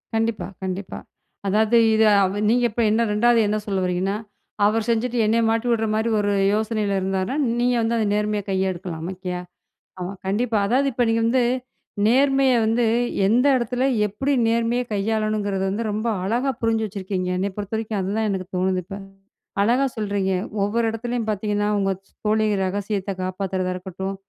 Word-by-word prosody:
கண்டிப்பா, 225 0 -1 0.2
கண்டிப்பா! 185 +1 -4 0.5
அதாவது, 215 +4 +3 0.2
இதை 220 0 +4 0.2
அவ 195 +2 -1
நீங்க 245 +1 +3
இப்ப 235 - -1
என்ன 220 +2 +2
ரெண்டாவது 235 +2 +4
என்ன 210 +1 0
சொல்ல 195 -2 0
வரீங்கன்னா, 185 +3 0 0.5
அவர் 220 +2 +1
செஞ்சுட்டு 235 +2 0
என்னைய 230 +2 +2
மாட்டி 230 +2 0
விடுற 225 -1 +1
மாரி 220 +2 0
ஒரு 205 0 +1 0.2
யோசனையில 215 -2 0
இருந்தார்னா, 190 +5 -1 0.2
நீங்க 245 +1 +2
வந்து 225 +1 0
அத 220 - +1
நேர்மையா 210 0 -1
கையெடுக்கலாம், 185 -3 -2
ஓகேயா? 180 -1 -5 0.6
ஆமா, 180 +1 -4 0.2
கண்டிப்பா. 220 +3 0
அதாவது 265 +5 +2
இப்போ 245 - +1
நீங்க 225 0 +2
வந்து 245 +2 +3 0.6
நேர்மைய 270 +2 +4
வந்து, 230 +2 +2 0.4
எந்த 240 +6 +3
எடத்தில, 245 +1 -1 0.2
எப்புடி 270 +8 -1 0.2
நேர்மைய 235 +1 +1
கையாளணுங்கிறது 210 -1 -1
வந்து, 205 +4 -2
ரொம்ப 215 +3 -2 0.2
அழகா 240 +7 0
புரிஞ்சு 225 -1 +1
வச்சுருக்கீங்க. 190 -2 -3
என்னை 195 +2 0
பொறுத்த 205 +1 -4
வரைக்கும், 220 -2 -2
அதுதான் 210 +4 -1
எனக்கு 190 -2 -3
தோணுது, 185 0 +1
இப்ப. 195 +2 -7 0.6
அழகா 240 +6 +3
சொல்றீங்க, 200 -3 -1 0.3
ஒவ்வொரு 225 +3 0
எடத்துலயும் 235 0 -3
பாத்தீங்கன்னா, 205 0 -1
உங்க 195 -1 +1 0.2
ச் - - -34
தோழி 215 +1 +2 0.2
ரகசியத்தை 200 +1 -2
காப்பாத்துறதா 185 0 -2
இருக்கட்டும், 190 +1 -5
210 Hz, 155 wpm, -23 LUFS, 195-230 Hz, 0.6 s, இதை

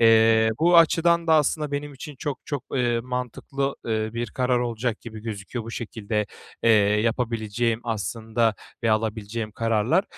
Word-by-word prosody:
Eee, 110 -1 +6
bu 175 +2 +5
açıdan 170 +1 +4
da 160 - +5
aslında 150 -1 +1
benim 145 +1 -3
için 145 +2 -9
çok 145 -2 -3
çok, 145 -4 -4
eee, 120 -2 +1
mantıklı, 125 +3 -3
eee, 110 -1 -1
bir 120 0 -2
karar 125 +1 +1
olacak 120 -1 -2
gibi 110 -2 -9
gözüküyor 110 +1 -5
bu 115 - -7
şekilde, 110 -2 -3 0.4
eee, 115 - +5 0.3
yapabileceğim 115 0 0
aslında 115 +1 0 0.3
ve 115 - +2
alabileceğim 110 0 -2
kararlar. 115 - +1
115 Hz, 145 wpm, -25 LUFS, 110-135 Hz, 0.4 s, Eee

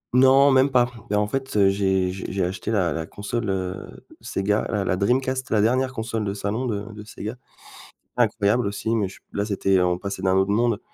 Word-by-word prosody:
non 135 +2 +6
même 130 +1 +4
pas. 125 -1 +2 0.2
Mais 105 - 0
en 105 0 +2
fait, 135 -1 -3
heu, 100 -1 +5
j'ai 95 -2 +1
j'ai 95 0 -6
j'ai 95 -1 -1
acheté 95 +4 -4
la 95 -8 +1
la 80 0 -4
console, 105 +1 -4
heu, 95 -1 -5 0.2
Sega, 105 +2 -1
la 105 -3 0
la 95 - +1
Dreamcast, 130 +6 0
la 110 - +2
dernière 130 +4 +2
console 110 -1 -3
de 100 0 -3
salon 110 +6 -2
de 105 0 -4
de 105 0 -9
Sega. 110 +1 -7 0.8
Incroyable 110 -1 +2
aussi, 110 +3 -2
mais 105 -4 +1
je 95 - -12
là 100 - -1
c'était 95 -2 +1
on 90 0 +1
passait 100 -1 -5
d'un 95 0 +2
autre 95 +1 +2
monde, 115 0 +1
105 Hz, 210 wpm, -23 LUFS, 95-120 Hz, 0.8 s, non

